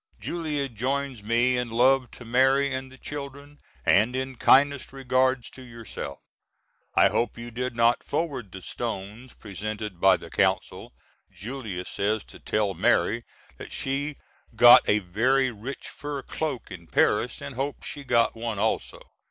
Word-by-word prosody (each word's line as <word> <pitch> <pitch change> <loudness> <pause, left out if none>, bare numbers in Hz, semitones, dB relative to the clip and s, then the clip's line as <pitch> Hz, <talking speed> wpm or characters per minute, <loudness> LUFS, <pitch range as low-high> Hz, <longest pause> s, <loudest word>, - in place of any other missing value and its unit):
Julia 150 -5 -2
joins 130 +1 -3
me 120 +4 +2
in 125 -1 -3
love 125 +2 +3
to 120 - -11
Mary 135 +3 +3
and 130 0 -5
the 130 - -14
children 140 +1 -8 0.3
and 110 +6 +4
in 130 0 -3
kindest 140 +2 +4
regards 130 -1 0
to 130 - -12
yourself. 115 - -8 0.8
I - - +6
hope 120 - -1
you 120 +1 -8
did 125 +1 -3
not 115 +1 +3
forward 135 - -3
the 95 0 -9
stones 115 +2 -5
presented 105 -1 -6
by 95 -1 +6
the - - -12
Consul. - - 0 0.4
Julia 105 -3 -6
says 105 +1 -1
to - - -14
tell 105 -2 0
Mary 115 +4 +1 0.3
that - - -10
she 140 +2 -2 0.4
got 120 +2 +8
a 105 - +5
very 130 +8 +2
rich 120 +5 -7
fur 145 -2 -6
cloak 145 -8 -4
in 85 -3 -9
Paris - - +1
and 70 - -7
hopes 135 +3 -4
she 145 - -5
got 115 -3 +2
one 115 -2 -4
also. 110 +2 -1
125 Hz, 150 wpm, -26 LUFS, 110-135 Hz, 0.8 s, got